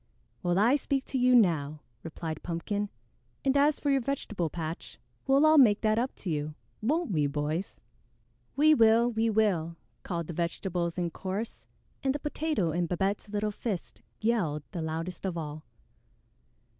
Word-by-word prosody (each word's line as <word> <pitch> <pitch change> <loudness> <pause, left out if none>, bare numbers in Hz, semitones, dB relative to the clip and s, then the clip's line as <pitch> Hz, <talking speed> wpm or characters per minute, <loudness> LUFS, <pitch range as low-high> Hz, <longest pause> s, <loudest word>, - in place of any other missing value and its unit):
"Well, 175 -1 +1
I 235 +8 +5
speak 275 -1 -1
to 265 - 0
you 250 0 +5
now," 155 -9 +3 0.2
replied 160 -1 -6
Pumpkin, 200 +4 -2 0.6
"and 270 0 +3
as 290 +1 +4
for 285 - +1
your 270 -1 +3
vegetable 215 - -2
patch, 160 +1 -6 0.3
we'll 275 +3 +5
all 310 -1 +7
make 220 -6 +6
that 215 0 +2
up 255 +3 -2
to 185 - -4
you, 150 0 -2 0.3
won't 300 +5 0
we, 150 -5 +2
boys?" 150 +5 -3 0.8
"We 310 +2 +6
will! 230 -2 +5
We 225 0 +1
will!" 190 -7 +1 0.3
called 170 -3 -3
the 170 - -6
vegetables 170 +1 -2
in 175 -2 -1
chorus, 195 +6 -5 0.3
and 270 0 +1
the - - -2
Potato 295 - -1
in 170 +2 0
Babette's 195 +4 -1
little 210 0 -1
fist 205 -3 -5 0.2
yelled 190 -10 0
the 175 - -4
loudest 165 +2 -4
of 185 -3 -2
all. 155 -1 -6
195 Hz, 160 wpm, -29 LUFS, 165-240 Hz, 0.8 s, all